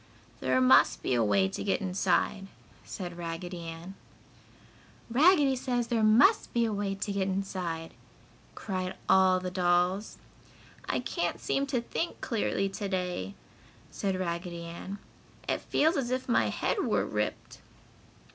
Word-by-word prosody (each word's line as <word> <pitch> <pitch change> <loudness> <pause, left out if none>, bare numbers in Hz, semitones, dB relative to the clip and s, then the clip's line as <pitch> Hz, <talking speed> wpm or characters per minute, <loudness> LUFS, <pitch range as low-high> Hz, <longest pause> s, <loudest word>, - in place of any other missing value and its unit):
"There 130 0 +2
must 130 0 +5
be - - 0
a 120 -2 +3
way 100 -2 +3
to - - -5
get 200 - +1
inside," 195 +1 0 0.4
said 175 -3 -7
Raggedy 175 +1 -5
Ann. 165 +3 -8 1.2
"Raggedy 290 0 +5
says 245 -2 -2
there 230 -2 +1
must 240 - +5
be 235 -1 +3
a 220 - -1
way 200 -1 -2
to 200 +1 -3
get 195 -1 0
inside!" 185 -4 -3 0.6
cried 185 -2 -4
all 190 0 +5
the 180 0 -5
dolls. 180 +2 +1 0.7
"I - - 0
can't - - -2
seem 275 0 -1
to 260 -3 0
think 330 +8 -3
clearly 205 -3 -1
to 195 +1 -5
day," 180 - -3 0.6
said 195 -2 -2
Raggedy 170 -1 -4
Ann. 170 +4 -7 0.5
"It - - -1
feels 320 +4 +2
as 255 -3 -1
if 255 +1 -2
my 245 - +2
head - - -1
were - - +1
ripped." - - -4
190 Hz, 145 wpm, -29 LUFS, 175-225 Hz, 1.2 s, must